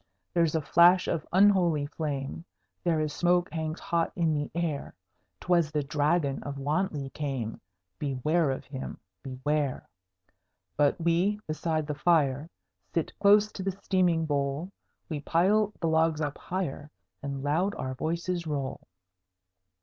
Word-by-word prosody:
There's 165 -2 +2
a 160 - +2
flash 175 +4 +5
of 155 - -2
unholy 180 -6 +4
flame; 140 - -4 0.4
There 165 -2 +2
is 155 -1 -1
smoke 175 -1 +2
hangs 160 0 -3
hot 170 -1 0
in 165 -2 +2
the 145 -1 -2
air: 165 -5 -2 0.4
'Twas 170 -3 +2
the 150 -2 -1
Dragon 145 0 +1
of 140 -1 -6
Wantley 145 -1 -1
came: 135 -7 -3 0.4
Beware 150 +3 +1
of 135 - -3
him, 135 -2 -6 0.2
beware! 135 +1 -2 0.9
But 145 +2 +2
we 170 +5 +2
beside 155 0 -1
the 150 - -3
fire 150 -2 +2 0.5
Sit 165 - 0
close 210 +1 +5
to - - -7
the 190 0 -2
steaming 175 -4 +2
bowl; 145 +4 -1 0.4
We 155 -3 -3
pile 195 +8 +2
the 165 - 0
logs 160 -1 +2
up 145 -2 -3
higher, 170 -5 -4 0.3
And 140 -1 -4
loud 175 +8 +1
our 130 0 -3
voices 170 +4 -2
roll. 140 -3 -3
155 Hz, 140 wpm, -28 LUFS, 145-175 Hz, 0.9 s, flash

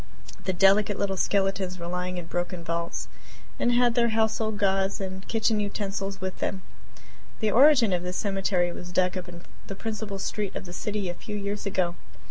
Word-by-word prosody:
The 190 - +2
delicate 195 +3 +4
little 195 -1 0
skeletons 195 -1 +1
were 170 - -6
lying 180 +1 -3
in 175 - -4
broken 175 +1 -3
vaults 170 -8 -2 0.5
and 240 - +3
had 240 -1 +4
their 235 -1 +3
household 220 -1 +1
gods 195 -1 +1
and 190 -1 -5
kitchen 220 -1 +2
utensils 200 -1 -3
with 190 0 -4
them. 190 -1 -2 0.8
The 215 -2 +1
original 245 -7 +6
of - - -7
this 180 +1 -3
cemetery 195 -3 +1
was 175 0 -8
dug 180 +1 +2
up 185 -1 -5
in 170 0 -10 0.2
the 195 - -5
principal 215 -1 -4
street 200 0 -3
of - - -4
the 175 - -8
city 205 +1 -2
a 175 - -2
few 210 +4 -7
years 205 0 -3
ago. 185 -3 +1
195 Hz, 185 wpm, -27 LUFS, 180-210 Hz, 0.8 s, original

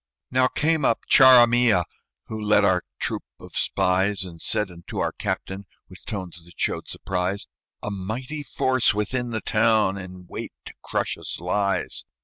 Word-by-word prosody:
Now 130 0 +4
came 160 +2 +1
up 115 - +2
Charamilla, 120 -7 +6 0.4
Who 110 -1 -6
led 105 -1 +4
our 90 -2 +3 0.2
troop - - -2 0.2
of - - -13
spies, 95 +2 +1
And 85 -3 -10
said 105 -3 0
unto 85 -1 -9
our - - 0
captain, 95 +1 -4 0.2
With 95 - -14
tones 90 -5 -6
that 85 -1 -18
showed - - -1
surprise, 95 +1 -3 0.4
"A 105 - -3
mighty 115 +10 -4
force 130 -4 +1
within 120 +4 -1
the 110 -1 -3
town, 110 -3 +2
In 90 -1 -10
wait - - -6
to - - -9
crush - - -2
us, - - -5
lies. 100 +3 -1
105 Hz, 155 wpm, -24 LUFS, 95-120 Hz, 0.4 s, Charamilla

